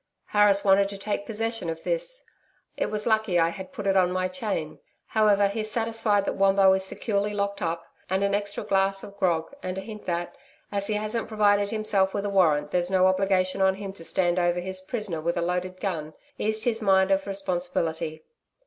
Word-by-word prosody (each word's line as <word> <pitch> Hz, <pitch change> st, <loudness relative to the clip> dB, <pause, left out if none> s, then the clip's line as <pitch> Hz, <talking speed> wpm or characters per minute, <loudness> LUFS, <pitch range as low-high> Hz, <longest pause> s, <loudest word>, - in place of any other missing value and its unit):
'Harris 205 Hz, -1 st, +4 dB
wanted 195 Hz, 0 st, +4 dB
to 200 Hz, -, -7 dB
take 205 Hz, 0 st, -3 dB
possession 225 Hz, -4 st, -2 dB
of 160 Hz, 0 st, -5 dB
this. -, -, -2 dB, 0.5 s
It -, -, -1 dB
was 210 Hz, 0 st, -2 dB
lucky 220 Hz, -5 st, +2 dB
I 165 Hz, -1 st, +4 dB
had 190 Hz, +8 st, -8 dB
put 225 Hz, -7 st, -7 dB
it 195 Hz, -1 st, +2 dB
on 180 Hz, -1 st, +4 dB
my 185 Hz, 0 st, 0 dB
chain. 185 Hz, -5 st, -4 dB, 0.3 s
However, 205 Hz, -2 st, +3 dB
he's 215 Hz, +2 st, -3 dB
satisfied 225 Hz, -2 st, +1 dB
that -, -, -1 dB
Wombo 195 Hz, 0 st, +5 dB
is 190 Hz, 0 st, 0 dB
securely 205 Hz, +1 st, -2 dB
locked 200 Hz, 0 st, -2 dB
up 165 Hz, 0 st, -2 dB, 0.2 s
and 190 Hz, +1 st, +1 dB
an 200 Hz, 0 st, +1 dB
extra 205 Hz, 0 st, -2 dB
glass 195 Hz, 0 st, +1 dB
of 200 Hz, -, -10 dB
grog 175 Hz, 0 st, 0 dB
and 185 Hz, 0 st, -4 dB
a -, -, -3 dB
hint 215 Hz, +1 st, -10 dB
that, 175 Hz, 0 st, -2 dB, 0.4 s
as 200 Hz, -1 st, -1 dB
he 215 Hz, -, 0 dB
hasn't 215 Hz, +2 st, -2 dB
provided 205 Hz, -2 st, +2 dB
himself 205 Hz, -3 st, +1 dB
with 200 Hz, -, -2 dB
a 200 Hz, -, -1 dB
warrant 150 Hz, -6 st, +3 dB
there's 175 Hz, 0 st, 0 dB
no 185 Hz, -1 st, +3 dB
obligation 185 Hz, 0 st, +2 dB
on 190 Hz, 0 st, +4 dB
him 195 Hz, -1 st, -6 dB
to 165 Hz, -, -11 dB
stand 175 Hz, +1 st, +1 dB
over 175 Hz, 0 st, +1 dB
his 185 Hz, +1 st, -4 dB
prisoner 190 Hz, -5 st, -3 dB
with 170 Hz, +2 st, -1 dB
a -, -, +1 dB
loaded 180 Hz, +1 st, -2 dB
gun, 160 Hz, -6 st, -4 dB, 0.2 s
eased 215 Hz, 0 st, -1 dB
his 230 Hz, -2 st, 0 dB
mind 190 Hz, -1 st, +3 dB
of 195 Hz, +1 st, +1 dB
responsibility. 175 Hz, -4 st, -2 dB
195 Hz, 205 wpm, -26 LUFS, 185-210 Hz, 0.5 s, Wombo